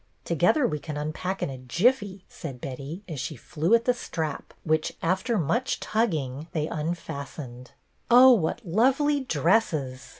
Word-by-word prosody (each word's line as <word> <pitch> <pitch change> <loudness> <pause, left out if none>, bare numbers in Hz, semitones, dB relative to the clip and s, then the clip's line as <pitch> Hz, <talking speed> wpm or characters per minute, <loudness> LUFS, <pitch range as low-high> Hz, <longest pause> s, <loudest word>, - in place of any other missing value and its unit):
Together 300 -5 +3
we 150 -7 -1
can 150 0 -6
unpack 155 +6 -3
in - - -2
a 130 - -8
jiffy," 195 - +1
said 135 -7 -8
Betty, 140 +9 -7
as 155 -6 -5
she 150 +4 -4
flew 165 - +1
at 235 0 +1
the 250 - +4
strap, 160 -9 -4
which, 155 -1 0
after 190 +7 +1
much 230 - 0
tugging, 155 - -1
they 155 -2 0
unfastened. 145 -6 -5 0.2
" - - -42
Oh, 250 +2 +9
what 205 +2 -1
lovely 270 - +2
dresses! 155 - 0
165 Hz, 155 wpm, -26 LUFS, 145-225 Hz, 0.2 s, Oh